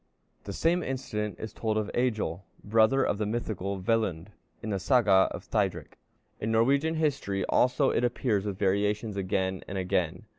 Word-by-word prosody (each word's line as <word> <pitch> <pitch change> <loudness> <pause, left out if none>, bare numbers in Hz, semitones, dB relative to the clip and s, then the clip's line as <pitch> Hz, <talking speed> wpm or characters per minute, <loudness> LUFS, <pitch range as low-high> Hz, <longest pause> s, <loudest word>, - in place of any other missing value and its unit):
'" - - -42
The 100 - -5
same 170 - +1
incident 105 - -4
is 110 -1 -6
told 110 -1 -1
of 105 -1 -2
Egil, 110 -8 -1 0.2
brother 115 +5 +3
of 100 - 0
the 105 - 0
mythical 100 -4 -3
Velundr, 95 -4 0 0.3
in 110 - -3
the 100 - -1
Saga 100 -3 +4
of - - -7
Thidrik. - - -2 0.4
In 110 - -2
Norwegian 140 +8 +2
history 140 -11 -1
also 130 +2 +2
it - - 0
appears 120 -4 0
with 100 -2 -4
variations 105 +2 0
again 95 -1 -1
and 100 - -5
again. 90 -2 -1
105 Hz, 170 wpm, -28 LUFS, 95-120 Hz, 0.4 s, Saga